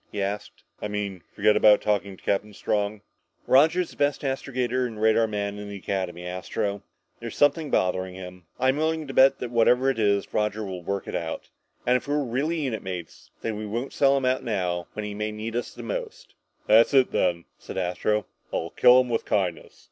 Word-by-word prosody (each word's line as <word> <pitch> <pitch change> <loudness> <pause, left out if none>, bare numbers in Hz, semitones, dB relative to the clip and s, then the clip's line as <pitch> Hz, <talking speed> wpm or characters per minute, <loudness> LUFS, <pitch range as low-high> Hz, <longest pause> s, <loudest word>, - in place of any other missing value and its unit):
he 105 - -5
asked. 100 +1 -4 0.2
"I - - -2
mean, 100 -3 -4
forget 105 +1 +4
about 105 -1 +6
talking 100 -2 -1
to - - -22
Captain 105 +1 -1
Strong?" 105 0 -1 0.4
"Roger's 160 +6 +4
the - - -14
best 145 0 +1
astrogator 130 -2 -1
and 110 -3 -9
radar 110 +1 +4
man 105 -1 -3
in 105 0 -7
the 100 - -6
Academy, 90 -2 -3
Astro. 95 +2 -3 0.4
There's 115 -1 -7
something 145 +1 +3
bothering 95 -2 0
him. 90 -2 -10
But - - -5
I'm 130 +2 +3
willing 160 0 0
to 135 - -7
bet 135 +1 +6
that 125 - -5
whatever 125 +3 +4
it 130 - -5
is, 100 -2 +1
Roger 105 0 0
will 95 -2 -6
work 100 +2 -3
it - - -5
out. 80 -1 -4 0.3
And 125 +1 +4
if 125 - -9
we're 145 0 +1
really 145 +7 -1
unit 130 -6 -2
mates, 90 -4 -7
then 110 -2 -3
we 105 0 -5
won't 120 +6 -4
sell 140 0 +4
him 135 - -1
out 130 0 +1
now, 90 -6 -2
when 105 - -4
he 105 - -5
may 105 +1 -3
need 110 +2 -5
us 120 - -4
most." - - -6 0.3
"That's 115 +6 +5
it, 130 -2 +5
then," 85 -2 0
said - - -8
Astro. 95 +4 0 0.3
"I'll 85 +1 -3
kill 125 0 +6
him 125 - -4
with 115 - 0
kindness. 90 -5 -2
105 Hz, 205 wpm, -25 LUFS, 100-130 Hz, 0.4 s, about